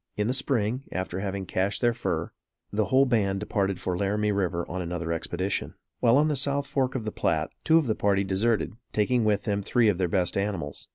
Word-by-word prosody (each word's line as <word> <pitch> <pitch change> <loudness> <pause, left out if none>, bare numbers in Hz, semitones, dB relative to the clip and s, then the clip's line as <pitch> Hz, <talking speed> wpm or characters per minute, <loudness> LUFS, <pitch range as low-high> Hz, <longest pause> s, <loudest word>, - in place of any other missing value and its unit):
In 105 - +1
the 125 - +1
Spring, 125 -2 0
after 95 0 -3
having 95 -1 -3
cached 95 +3 -1
their 120 -1 +3
fur, - - -2 0.4
the 105 0 +2
whole 135 +1 +4
band 100 -6 +1
departed 100 -2 -1
for 90 - -2
Laramie 105 +3 0
River 90 -4 -1
on 90 +1 -4
another 85 -1 -3
expedition. 90 +3 -2 0.2
While 120 +1 +5
on 150 +2 +4
the 150 - +1
south 140 +1 0
fork 135 -2 -1
of 120 -4 -3
the 110 - -2
Platte, 80 -5 0
two 160 - +5
of 160 - +3
the 110 - +1
party 100 -2 +1
deserted, 105 +4 0 0.2
taking 115 +2 +2
with 105 -2 +2
them 100 -1 0
three 115 +2 +3
of 95 -3 0
their 90 - +2
best 90 +1 +1
animals. 95 -8 -3
100 Hz, 215 wpm, -27 LUFS, 95-120 Hz, 0.4 s, While